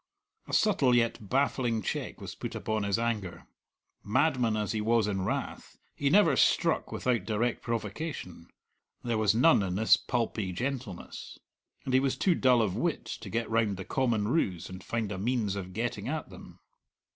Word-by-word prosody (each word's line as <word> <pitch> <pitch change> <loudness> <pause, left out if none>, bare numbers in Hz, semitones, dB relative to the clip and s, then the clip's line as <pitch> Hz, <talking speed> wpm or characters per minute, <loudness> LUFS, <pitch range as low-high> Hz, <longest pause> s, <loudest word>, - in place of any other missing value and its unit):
A - - -8
subtle 140 - +3
yet 115 -4 0
baffling 125 -4 +1
check - - -4
was - - -7
put - - -6
upon 110 -1 -2
his 100 -1 0
anger. 110 -6 -3 0.6
Madman 115 0 +2
as 105 -1 -1
he 110 - -1
was 115 0 +2
in 95 -2 -1
wrath, - - -4 0.2
he 140 - 0
never 205 +7 +5
struck - - +2
without 125 -3 0
direct 115 +2 -1
provocation; 110 - -5 0.6
there 115 -2 0
was 110 0 +3
none 145 +2 +5
in 95 -2 -2
this 110 +1 +5
pulpy 110 -5 -2
gentleness. 120 -4 -5 0.5
And 130 - -2
he 130 - +6
was 135 -1 0
too 185 - +3
dull 125 -6 +4
of 95 -4 -1
wit - - -1 0.2
to - - -7
get 115 0 -1
round 110 -4 +1
the 95 - -6
common 115 -6 0
ruse 95 - -1
and 95 0 -9
find 115 -3 -2
a 100 - -4
means 110 -2 0
of 95 -2 -5
getting - - -3
at - - -4
them. - - -13
115 Hz, 175 wpm, -29 LUFS, 100-125 Hz, 0.6 s, he